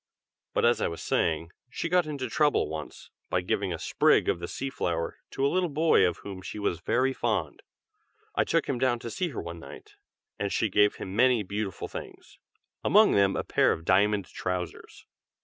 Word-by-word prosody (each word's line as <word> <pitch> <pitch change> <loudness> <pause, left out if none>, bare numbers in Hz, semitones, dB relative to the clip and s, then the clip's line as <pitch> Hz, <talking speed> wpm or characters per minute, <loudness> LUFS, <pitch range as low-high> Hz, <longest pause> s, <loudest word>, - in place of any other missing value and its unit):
But - - +3
as 120 -2 +3
I - - +2
was 85 - -6
saying, 80 +1 0 0.2
she 135 - -3
got 175 -1 +2
into 140 -4 -3
trouble 145 +5 +2
once, 80 0 -8 0.2
by 90 - +1
giving 95 +1 -1
a 85 - -2
sprig - - +3
of - - 0
the 85 - -5
sea 135 +7 -4
flower 85 -8 -2
to 135 - -1
a - - +5
little 180 +3 +1
boy 155 - +4
of 85 - -3
whom 95 -2 -7
she 100 - -7
was 90 -5 -1
very 130 +9 +1
fond. - - -2 0.7
I - - +2
took 165 -2 0
him 130 -3 -1
down 130 -2 +2
to 115 0 -7
see 180 - -1
her 135 - -6
one 85 0 -7
night, - - -12 0.4
and 100 -1 -1
she 110 - +1
gave 105 +1 +3
him 95 0 -7
many 125 -1 +4
beautiful 100 0 -4
things, - - -10 0.4
among 215 +1 +6
them 100 -1 +3
a - - -1
pair - - +3
of 80 - -4
diamond 100 +2 +3
trousers." 90 -1 -5
105 Hz, 200 wpm, -28 LUFS, 90-135 Hz, 0.7 s, among